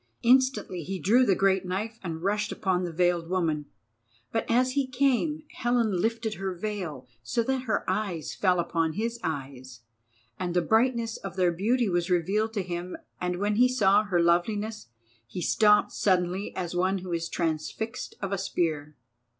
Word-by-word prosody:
Instantly 255 -7 +3
he 190 +5 -4
drew 230 - +4
the 195 - +4
great 190 0 +2
knife 210 +5 -4
and 165 -2 -5
rushed 210 +2 0
upon 185 -2 0
the 175 -2 -3
veiled 175 0 +1
woman. 160 -5 0 0.6
But 225 - -2
as 255 +2 +3
he 275 0 0
came, 275 +4 +1
Helen 230 -6 +1
lifted 225 0 -1
her 195 -2 -4
veil 175 -9 -5
so 120 - -1
that 260 +1 -1
her 220 -4 -1
eyes 180 -8 -2
fell 185 -3 +2
upon 165 -2 0
his 230 +4 -2
eyes, 130 -5 -5 0.6
and 175 -1 -2
the 180 - +4
brightness 230 +1 +1
of 195 -2 -7
their 180 -2 +3
beauty 225 +7 +1
was 175 -1 0
revealed 195 +6 +1
to 200 -4 -1
him; 175 0 -5 0.2
and 180 0 -2
when 205 +2 0
he 250 +2 +6
saw 210 -5 +4
her 185 -4 +1
loveliness 205 - +1 0.4
he 150 - -6
stopped 210 +3 +4
suddenly 185 0 0
as 175 -2 -3
one 185 +2 +1
who 180 -1 -5
is 165 0 -2
transfixed 175 +8 -3
of 195 - -2
a 195 - -1
spear. 155 -6 -2
190 Hz, 170 wpm, -27 LUFS, 175-225 Hz, 0.6 s, he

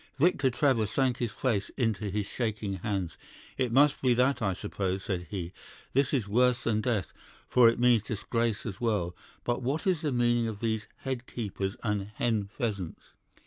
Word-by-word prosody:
"Victor 145 -3 +3
Trevor 125 -4 +2
sank 130 +3 +1
his 120 -3 -1
face 110 -7 -1
into 110 -4 0
his 105 +1 -1
shaking 105 -3 -2
hands. 95 -2 -3 0.4
'It 125 -3 +1
must 140 +4 +4
be 125 -2 +4
that, 130 +2 +2
I 95 -3 +1
suppose,' 95 -1 -3
said 90 -3 -3
he. 90 -3 -4 0.4
'This 140 +1 +3
is 115 -7 0
worse 125 +3 +3
than 110 -2 +1
death, 110 -8 -1 0.3
for 120 -2 +6
it 115 - -1
means 120 -2 +5
disgrace 110 +1 -1
as 105 -2 -5
well. 100 -7 0 0.3
But 120 +1 -1
what 135 +6 -1
is 180 -5 +2
the 150 - 0
meaning 120 -1 +2
of 110 -2 -5
these 110 -1 -1
"head 130 -2 -3
keepers" 100 -4 -3
and 105 -2 -1
"hen 110 -3 +1
pheasants"? 100 - -4
115 Hz, 180 wpm, -29 LUFS, 100-125 Hz, 0.4 s, for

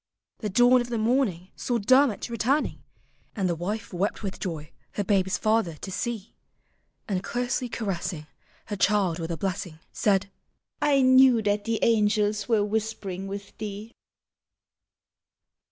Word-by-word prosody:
The 210 - -3
dawn 245 +4 +5
of 240 - -5
the 235 - -1
morning 215 -6 +1
Saw 245 - -1
Dermot 255 +1 +3
returning. 245 +6 0 0.5
And 195 -4 0
the 175 - +1
wife 200 +6 -4
wept 195 +5 -1
with 195 -1 -4
joy 160 -5 -5 0.2
her 205 - -1
babe's 190 -1 +1
father 215 -7 +1
to 205 +7 -3 0.9
And 190 -2 -1
closely 245 +2 -2
caressing 180 -8 -3 0.4
Her 210 - -4
child 195 -4 +2
with 165 0 -4
a 165 - -3
blessing. 185 -4 -3 0.2
Said, 200 -1 +1 0.3
" - - -52
I 275 -1 +4
knew 255 -3 +6
that 205 0 0
the 230 -1 0
angels 210 -1 +2
were 215 -3 +3
whispering 205 -3 -3
with 200 +1 -7
thee." 210 +1 -6
210 Hz, 140 wpm, -26 LUFS, 190-230 Hz, 0.9 s, knew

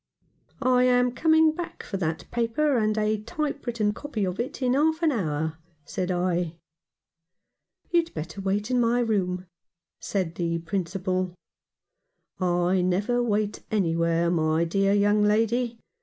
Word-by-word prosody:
" - - -35 0.2
I 250 - +4
am 250 0 +3
coming 315 +3 +4
back 340 +2 -7
for 195 - -4
that 160 -3 -2
paper 240 +5 +1
and 215 -2 +1
a 215 0 +1
type 290 +2 -4
written 215 -3 0
copy 225 -6 -3
of 180 0 -4
it 240 +3 -3
in 255 -2 +1
half 315 +4 +2
an 320 - +4
hour," 160 - -2 0.3
said 180 +4 -3
I. 175 -2 0 1.4
"You'd 340 -1 +2
better 160 +5 -5
wait 205 +4 -1
in 250 - +3
my 240 +1 +2
room," 185 -6 0 0.5
said 185 -5 -2
the 170 0 -1
Principal. 185 +1 -2 0.5
" - - -51
I 180 0 +2
never 200 +7 +1
wait 210 -3 -1
anywhere, 170 -3 +1
my 160 -1 +2
dear 195 +3 +1
young 205 +1 +3
lady. 225 +3 +1
205 Hz, 145 wpm, -26 LUFS, 180-245 Hz, 1.4 s, I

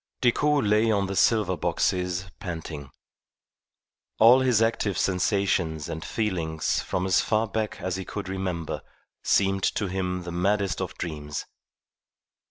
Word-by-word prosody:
Decoud 145 +2 +2
lay 105 +2 +3
on 100 -2 +2
the 95 0 -4
silver 105 -3 +3
boxes 90 0 0
panting. 80 -7 -6 1.3
All 120 +4 +7
his 125 -4 +3
active 115 -3 +1
sensations 90 -4 0
and 80 +1 -5
feelings 85 -8 -1
from 90 - -2
as 95 - +3
far 110 0 +1
back 110 +1 -3
as 95 0 -2
he 95 - -4
could 100 +1 -6
remember 95 -4 -3 0.4
seemed 95 -1 +2
to 105 - 0
him 90 -1 -2
the 85 - -6
maddest 100 +2 0
of - - -5
dreams. 75 -3 -5
95 Hz, 135 wpm, -26 LUFS, 90-105 Hz, 1.3 s, All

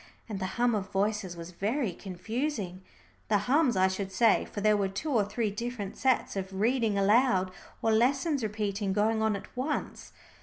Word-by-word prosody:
And 210 -4 -4
the 190 - -2
hum 240 0 +3
of 200 -3 -2
voices 195 -2 -1
was 170 +1 -8
very 215 +5 -1
confusing, 200 - -4 0.5
the 210 - +3
hums 265 -3 +3
I 185 0 +5
should 190 +1 -3
say, 225 +2 +3
for - - -7
there 215 +1 +4
were 200 -1 +1
two 205 +11 -4
or 225 -6 +3
three 210 +1 -2
different 230 -2 -4
sets 260 -5 +1
of 190 0 -4
reading 225 -2 +2
aloud, 200 -2 +3 0.3
or 225 - +3
lessons 270 +6 +2
repeating, 205 -2 -2
going 220 +2 +2
on 220 -1 +2
at 200 - -9
once. 275 +4 -3
210 Hz, 180 wpm, -29 LUFS, 195-240 Hz, 0.5 s, I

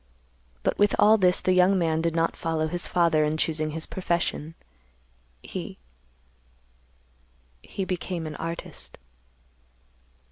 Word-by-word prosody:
But - - 0
with 205 0 +4
all 215 +1 +6
this 180 -1 +4
the 185 - +2
young 185 +2 +5
man 160 -2 +1
did 165 0 0
not 165 0 +1
follow 160 -1 -1
his 175 +2 0
father 165 -3 +3
in 150 +1 0
choosing 155 -1 0
his 160 +1 -4
profession. 170 -3 -2 0.9
He—he - - -6 2.1
became 180 -2 -3
an 155 -1 -5
artist." 165 +1 -6
165 Hz, 115 wpm, -26 LUFS, 160-180 Hz, 2.1 s, all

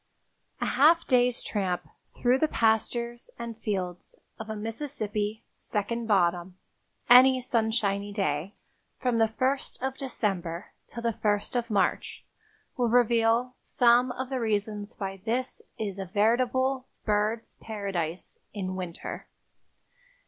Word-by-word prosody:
A - - -1
half 315 +6 +4
day's 250 -2 +3
tramp 190 -4 -2 0.3
through 250 +2 +3
the 315 - +3
pastures 235 0 0
and 235 -1 -6
fields 190 -5 -4 0.2
of 220 0 -7
a 220 - -3
Mississippi 220 -2 -3
"second 230 +2 -3
bottom" 180 -3 +1 0.5
any 255 +1 +8
sunshiny 220 -4 0
day 195 -2 -2 0.4
from 245 -3 +1
the 225 - +5
first 260 +5 -1
of 265 0 -1
December 190 - -2 0.2
till 235 - -7
the 230 -1 +1
first 205 +2 0
of 240 -1 -1
March 205 -3 0 0.5
will 245 -2 +1
reveal 235 +1 +3
some 245 +1 +4
of 260 +1 -5
the 260 - -1
reasons 210 -2 -2
why 195 -1 -4
this 245 +3 -1 0.2
is 200 -3 -4
a 195 - -3
veritable 250 +6 +1 0.2
birds' 215 +2 0
paradise 195 -6 -4 0.2
in 185 -2 -3
winter. 180 -3 -6
220 Hz, 125 wpm, -28 LUFS, 200-245 Hz, 0.5 s, any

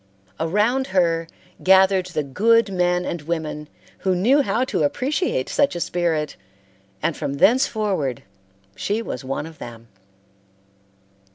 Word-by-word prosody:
Around 210 +11 +1
her 165 -2 +2 0.3
gathered 190 0 +4
the 160 -4 -2
good 215 +9 +2
men 180 0 +1
and 170 - -4
women 155 -1 -4 0.3
who 190 -1 +1
knew 245 +11 +4
how 255 -2 0
to 255 - -2
appreciate 265 - 0
such 280 -10 +1
a - - -3
spirit, 165 -4 -1 0.7
and 165 - 0
from 140 - -3
thenceforward 205 - +1 0.5
she 210 - -2
was 125 - -5
one 135 +3 -3
of 160 -1 -12
them. 115 -1 -10
180 Hz, 125 wpm, -22 LUFS, 155-215 Hz, 0.7 s, gathered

